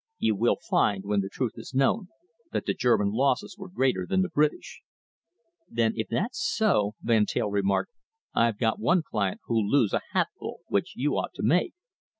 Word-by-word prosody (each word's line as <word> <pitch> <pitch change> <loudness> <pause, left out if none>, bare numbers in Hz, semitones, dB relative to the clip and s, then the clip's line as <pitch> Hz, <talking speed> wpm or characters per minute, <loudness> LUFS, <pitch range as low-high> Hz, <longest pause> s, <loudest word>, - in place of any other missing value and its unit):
You 110 - +2
will 115 +4 +2
find, 95 -2 +2
when 100 0 +1
the 95 - -4
truth 125 0 -2
is - - -9
known, 155 +10 +2 0.4
that - - -2
the - - +1
German 105 -5 +2
losses 130 - 0
were 195 -2 -9
greater 130 - 0
than 190 - +2
the 190 - -3
British." 150 0 0 0.9
"Then 115 -1 +1
if 110 - -2
that's 205 - -2
so," 110 - +1
Van 110 -3 +3
Teyl 105 - -1
remarked, 100 - 0 0.4
"I've 115 -2 +2
got 110 -1 0
one 170 +9 +2
client 100 -9 -2
who'll 110 -3 0
lose 125 -6 +3
a - - +1
hatful - - -2
which 100 - -1
you 145 +4 0
ought - - -4
to - - -5
make. 180 - +2
115 Hz, 180 wpm, -27 LUFS, 105-145 Hz, 0.9 s, Van